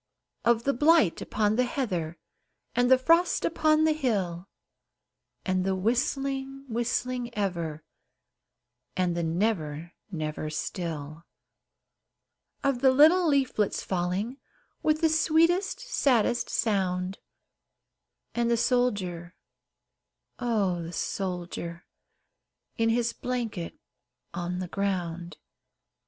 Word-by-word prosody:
Of 230 0 +3
the 275 - +2
blight 295 - +4
upon 210 0 0
the 250 - +4
heather, 185 - -2 0.6
And 245 0 +2
the 260 - +7
frost 330 +7 +3
upon 310 -1 +3
the 315 - +4
hill, 195 - -1 1.0
And 185 -1 +1
the 190 0 0
whistling, 270 +5 -1
whistling 240 +1 -2
ever, 170 -6 -2 1.1
And 180 -2 +1
the 170 - -1
never, 165 -2 -1 0.2
never 155 -2 -3
still; 155 -1 -4 1.4
Of 275 -3 +1
the 270 - +6
little 315 +7 +6
leaflets 265 -8 +1
falling, 190 +7 -2 0.4
With 310 +1 +1
the 325 - +5
sweetest, 330 +4 +2
saddest 250 - +1
sound 190 -3 0 1.1
And 235 0 +1
the 235 - +3
soldier 200 -9 0 1.0
oh! 205 -8 0
the 165 +1 -7
soldier, 175 -2 -4 0.9
In 225 -1 +2
his 235 +1 +1
blanket 230 -9 -4 0.6
on 175 0 -3
the 185 0 -3
ground. 175 -4 -3
215 Hz, 100 wpm, -27 LUFS, 175-260 Hz, 1.4 s, the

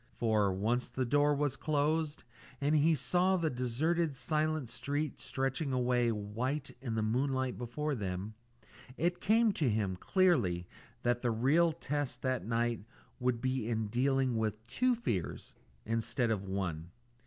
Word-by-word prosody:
For, 110 -4 +2
once 110 +7 0
the 130 - -1
door 145 +4 +3
was 145 -2 0
closed, 155 +1 0 0.4
and 145 +2 +1
he 155 +2 +4
saw 180 +8 +2
the 165 -3 0
deserted 145 +6 0
silent 155 +2 0
street 140 +4 -3
stretching 135 +2 -2
away 125 -1 +2
white 120 +7 -3
in 120 -4 -3
the 110 - 0
moonlight 130 +3 0
before 145 +6 -3
them, 100 -2 -3 0.6
it 175 +2 0
came 220 +2 +4
to 155 -9 0
him 105 -4 0
clearly 110 - +2 0.4
that 120 0 +1
the 125 - +1
real 140 +9 +3
test 145 -5 -3
that 130 -6 -1
night 115 0 0 0.4
would 125 -2 0
be 130 -3 -1
in 110 -2 -1
dealing 130 +1 +1
with 110 0 -2
two 250 - +2
fears 110 - -3 0.3
instead 115 +2 0
of 100 -3 -1
one. 90 -4 -3
130 Hz, 145 wpm, -33 LUFS, 115-150 Hz, 0.6 s, he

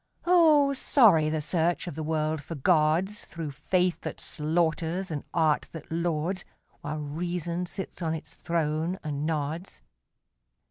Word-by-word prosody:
Oh, 315 -5 +5
sorry 205 - +5
the 155 0 -1
search 170 +2 +1
of 175 - -5
the 160 - -5
world 155 -1 -1
for 165 +4 -7
gods, 165 +6 +2
Through 165 -3 -6
faith 180 +5 0
that - - -5
slaughters 165 +3 -1
and 145 -2 -3
art 160 -3 +2
that 160 -2 -9
lauds, 170 +2 -1 0.4
While 150 +1 -4
reason 170 +3 -3
sits 190 +1 -7
on 160 -1 0
its 160 - -9
throne 165 +1 -1
and 150 -1 -2
nods. 155 - -3
165 Hz, 140 wpm, -28 LUFS, 155-180 Hz, 0.4 s, Oh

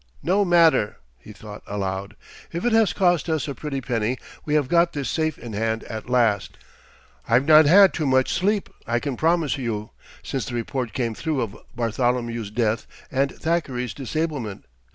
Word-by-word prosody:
"No 195 +4 +3
matter," 165 - +4 0.2
he - - -13
thought - - -10
aloud; 95 -1 -4 0.4
"if 170 +6 -4
it 240 - +3
has 225 -3 +4
cost 175 -4 +2
us 160 -2 0
a 140 - -3
pretty 140 -1 -4
penny, 120 0 -1 0.3
we 150 - 0
have 145 -3 +2
got 170 +3 +3
this 140 -3 -3
safe 155 -2 -1
in 115 -2 -8
hand 110 +2 -1
at 110 +1 -7
last. 115 -6 +1 0.7
I've 120 +4 +4
not 155 -1 +7
had 195 +4 +7
too 155 -3 -1
much 130 0 +2
sleep, 200 +2 +1 0.2
I 120 +1 +1
can 140 0 -3
promise 160 -1 +1
you, 110 -4 -3 0.3
since 135 -3 -3
the 120 - -4
report 120 0 -3
came 120 -3 -1
through 150 +3 -2
of 110 -4 -4 0.2
Bartholomew's 120 -1 -1
death 110 0 -1 0.2
and 135 +1 +1
Thackeray's 140 -7 -2
disablement. 140 -6 -4
130 Hz, 175 wpm, -23 LUFS, 115-160 Hz, 0.7 s, not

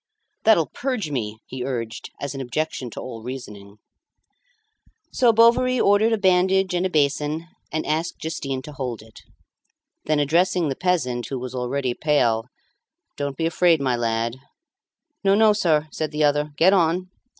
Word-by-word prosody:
"That'll 210 -8 +5
purge 245 - -3
me," 110 -5 -3
he 130 -1 -6
urged 115 -4 -4
as 140 -2 -4
an 135 - -5
objection 130 0 -3
to - - -8
all 115 -3 -7
reasoning. 105 -5 -9 1.3
So 245 -3 +4
Bovary 235 +3 +4
ordered 205 +2 +4
a 225 - +2
bandage 190 -1 +2
and 180 +1 +1
a - - -8
basin, 150 +1 0 0.3
and 155 - -2
asked 160 +2 -1
Justin 140 -5 -4
to 150 - -9
hold 125 -6 -5
it. 110 0 -16 0.8
Then 155 0 +1
addressing 165 +3 +2
the 135 - -2
peasant, 130 -10 -1
who 135 - -4
was 125 0 -6
already 125 0 -2
pale 120 -6 +1 0.7
"Don't 140 -1 -4
be 165 - -1
afraid, 170 -1 +3
my 130 -3 +1
lad." 115 0 -1 0.9
"No, 195 0 +4
no, 215 0 +5
sir," 160 -7 +1
said 155 -1 -3
the 150 +1 -1
other; 150 0 +2
"get 185 +6 +5
on." 180 0 +1
150 Hz, 160 wpm, -23 LUFS, 125-180 Hz, 1.3 s, That'll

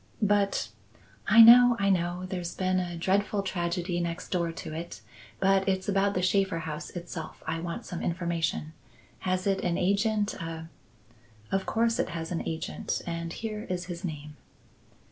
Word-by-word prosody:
"But 200 - +2 0.3
" 100 +1 -27
"I 225 +2 +9
know, 245 +1 +9
I 200 0 +3
know; 175 0 0
there's 180 -2 -4
been 185 0 +1
a 175 -2 -4
dreadful 200 +3 +1
tragedy 175 -1 -2
next 170 0 -3
door 170 -2 0
to 165 - -7
it; 170 +2 -6 0.4
but 195 0 +3
it's 190 0 -1
about 200 0 +2
the 180 - 0
Shaffer 190 -1 +2
house 150 -2 -5
itself 175 -2 -7
I 165 +1 -2
want 170 0 -5
some 175 - -5
information. 170 -3 -2 0.5
Has 185 +2 -1
it 195 -1 +1
an 175 -1 0
agent, 205 +2 +1
a 165 -2 -6 0.4
" 110 -2 -28
"Of 195 0 0
course 230 +1 +1
it - - 0
has 165 0 -5
an 170 - -1
agent, 160 0 -3
and 170 -1 -4
here 215 +2 -5
is 180 -1 -2
his 175 0 -7
name." 150 -3 -6
180 Hz, 170 wpm, -28 LUFS, 165-195 Hz, 0.5 s, I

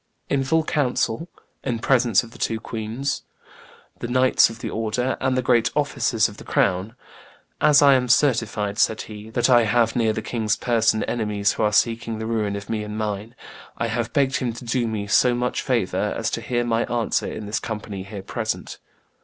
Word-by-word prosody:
"in 140 -1 +2
full 160 +4 +2
council, 145 0 -1 0.3
in 125 -4 -1
presence 120 -4 +3
of 115 - -12
the 120 - -14
two 110 +2 -1
queens, 115 +5 -3 0.8
the - - -4
knights 130 +1 +4
of 115 - -9
the - - -5
order, 115 +4 -1
and 130 0 +1
the 130 - 0
great 120 -2 +3
officers 130 -6 +1
of 105 - -12
the - - -10
crown. 95 +4 0 0.7
'As 145 -1 +6
I 140 -1 +7
am 125 -1 +2
certified,' 115 -6 +1
said 110 - +2
he, 105 0 -10
'that 120 +1 +1
I 120 -3 +5
have 115 +1 +2
near 115 -2 +2
the 110 0 -4
king's 110 -3 -1
person 115 -2 +1
enemies 105 -3 0
who - - -4
are 105 -1 +3
seeking 115 +1 +1
the 110 - -4
ruin 110 -3 -1
of 100 0 -7
me 110 -1 -2
and 105 0 -6
mine, 105 +1 -4 0.4
I 115 - -1
have 115 0 -2
begged 135 0 +2
him 120 -3 -2
to 120 +2 -10
do 120 0 0
me 110 -2 -3
so 120 +4 +3
much 125 0 -1
favor 120 -8 0
as - - -1
to - - -3
hear 120 -1 -1
my 115 0 0
answer 120 -1 -1
in 110 - -6
this 105 +2 -2
company 105 -3 -5
here 100 0 -8
present. 110 +2 -4
115 Hz, 200 wpm, -23 LUFS, 110-125 Hz, 0.8 s, I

